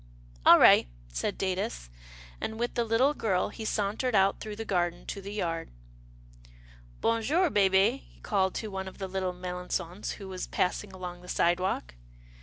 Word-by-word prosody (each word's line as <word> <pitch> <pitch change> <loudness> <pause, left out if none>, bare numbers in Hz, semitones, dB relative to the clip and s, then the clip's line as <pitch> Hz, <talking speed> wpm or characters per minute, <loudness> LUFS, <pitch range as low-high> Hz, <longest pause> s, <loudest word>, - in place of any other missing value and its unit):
All - - +11
right," - - +7 0.2
said - - -2
Datus, 120 - -2 0.5
and, 220 - -3
with 240 0 -1
the 235 - +1
little 230 +6 +3
girl, 195 -9 0
he 225 - -8
sauntered 215 +4 0
out 195 0 +3
through 215 -1 -6
the 225 +1 -5
garden 175 -3 -1
to 200 - -5
the 200 +1 -7
yard. 165 -5 -3 1.3
Bon 230 0 +2
jour, 320 +8 +2
hehe," 200 +5 +4
he - - -23
called 190 -3 +1
to 220 - -3
one 190 0 -4
of 190 - -9
the 195 - -4
little 185 -1 -2
Melangons 180 +1 -4
who 195 - -9
was 185 -1 -5
passing 180 - -1
along 180 -1 -7
the 180 - -14
sidewalk. 175 - 0
190 Hz, 170 wpm, -29 LUFS, 180-215 Hz, 1.3 s, All